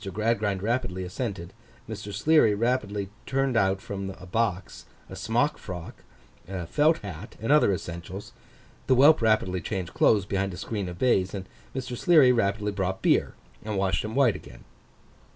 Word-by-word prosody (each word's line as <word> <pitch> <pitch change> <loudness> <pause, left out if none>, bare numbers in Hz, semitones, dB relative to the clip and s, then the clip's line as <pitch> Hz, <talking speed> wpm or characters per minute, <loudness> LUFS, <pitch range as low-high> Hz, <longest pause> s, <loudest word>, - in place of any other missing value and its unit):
Gradgrind 105 -1 0
rapidly 110 -5 -1
assented; 95 -2 -5 0.3
Mr. 105 -2 -6
Sleary 150 -4 +4
rapidly 105 -4 -1 0.2
turned 135 -1 0
out 95 -3 +2
from 100 -1 -5
a 90 - -10
box, 95 -2 -2 0.2
a - - -6
smock 120 +7 0
frock, 90 -3 -8 0.4
a 90 -2 -5
felt 150 - +3
hat, 90 -6 -8
and 115 +6 -1
other 150 -8 +5
essentials; 90 +2 -6 0.6
the 130 - +4
whelp 145 +4 +6
rapidly 110 -5 +2
changed 95 0 -4
clothes 100 -4 +3
behind 95 -1 -2
a - - -10
screen 100 -3 -4
of 90 - -8
baize; 95 -5 +2 0.4
Mr. 130 -1 -4
Sleary 150 -3 +5
rapidly 105 -3 0
brought 95 -1 -3
beer, - - +2 0.3
and 105 -2 -3
washed 95 -1 +1
him 110 +2 -5
white 135 -5 +4
again. - - -12
105 Hz, 155 wpm, -26 LUFS, 95-120 Hz, 0.6 s, whelp